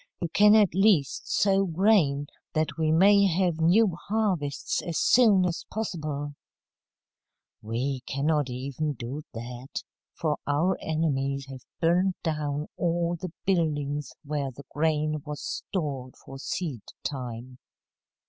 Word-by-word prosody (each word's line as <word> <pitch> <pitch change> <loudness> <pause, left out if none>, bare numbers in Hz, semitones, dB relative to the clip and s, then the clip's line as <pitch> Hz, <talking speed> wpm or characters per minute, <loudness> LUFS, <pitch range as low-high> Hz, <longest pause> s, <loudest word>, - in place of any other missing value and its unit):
"You 170 - -2
can 210 +4 +6
at 210 -6 +5
least 190 -8 +2
sow 195 -1 +3
grain, 165 -6 +3 0.3
that 155 0 0
we 160 -1 +1
may 200 +4 +6
have 175 -2 +1
new 185 +3 +4
harvests 195 -10 0
as 170 -2 -3
soon 215 -7 +5
as 175 -1 -2
possible." 150 -9 -3 1.3
"We 125 +5 -2
cannot 145 0 +1
even 140 +4 -3
do 130 +4 -6
that, 120 +3 -6 0.3
for 155 -3 -1
our 160 +6 +2
enemies 140 -4 -1
have 130 -2 -10
burned 180 +3 +2
down 150 -2 -1
all 170 0 0
the 175 +1 -6
buildings 150 -6 0
where 145 -2 -2
the 135 +2 -12
grain 155 0 0
was 150 -1 -6
stored 140 -8 -4
for 135 0 -11
seed 145 - -3 0.2
time." 125 -2 -5
155 Hz, 125 wpm, -27 LUFS, 140-180 Hz, 1.3 s, can